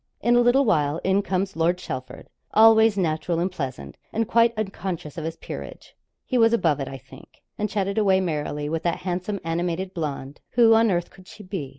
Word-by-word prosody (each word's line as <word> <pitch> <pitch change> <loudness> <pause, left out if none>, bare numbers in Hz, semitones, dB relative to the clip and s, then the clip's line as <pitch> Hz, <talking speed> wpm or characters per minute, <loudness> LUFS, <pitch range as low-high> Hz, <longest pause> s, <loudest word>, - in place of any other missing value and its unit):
In 240 +2 +2
a 240 - +5
little 250 +3 +4
while 155 -7 +1
in 190 +1 +2
comes 195 0 -2
Lord 165 +2 +1
Chelford, 130 -7 -7 0.3
always 220 -1 +6
natural 165 -1 -1
and 180 +3 0
pleasant, 130 - -6
and 225 0 -1
quite 230 0 +4
unconscious 190 -7 -4
of 160 - -5
his 165 0 -4
peerage - - -9 0.3
he 255 - 0
was 225 0 +5
above 165 -10 +2
it, 135 - -3
I 135 - -7
think 130 - -17
and 210 0 -2
chatted 200 0 -1
away 195 -3 +3
merrily 150 -4 -2
with 160 +1 -2
that 170 0 -2
handsome 185 +2 -3
animated 175 +3 -2
blonde 145 -4 -5
who 230 -2 +6
on 225 0 +4
earth, 175 -2 -1
could 185 -1 -17
she 210 - -12
be? 180 -8 -5
185 Hz, 200 wpm, -24 LUFS, 160-215 Hz, 0.3 s, always